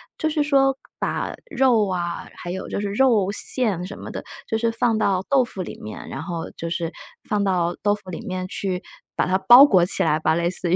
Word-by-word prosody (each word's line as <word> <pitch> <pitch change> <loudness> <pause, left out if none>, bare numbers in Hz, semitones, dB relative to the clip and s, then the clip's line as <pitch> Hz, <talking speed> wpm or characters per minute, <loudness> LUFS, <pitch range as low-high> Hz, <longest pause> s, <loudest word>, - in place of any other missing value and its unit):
就 315 - -1
是 305 -1 +1
说 270 -2 +3 0.2
把 - - -2 0.2
肉 240 -6 +3
啊， 175 -2 -3
还 175 - -7
有 190 +1 -5
就 - - -3
是 205 0 -2
肉 215 -5 +3
馅 210 -4 +1
什 200 - -9
么 - - -8
的， - - -6 0.2
就 220 - -1
是 230 0 +1
放 225 0 +1
到 190 -2 +1
豆 270 -2 +4
腐 200 -6 -5
里 - - -9
面， 105 0 -8
然 - - -6
后 170 -3 -5
就 165 - -6
是 170 -1 -2 0.4
放 210 -3 0
到 175 -3 0
豆 205 0 +2
腐 190 -3 -11
里 170 - -6
面 185 -1 -3
去， 185 -1 -3 0.3
把 - - +1
它 185 +1 +1
包 240 +8 +9
裹 190 -11 +4
起 180 - +2
来 155 - +2
吧， 160 0 +1
类 170 +1 0
似 180 -1 -2
于， - - +5
195 Hz, 245 characters per minute, -22 LUFS, 175-230 Hz, 0.4 s, 包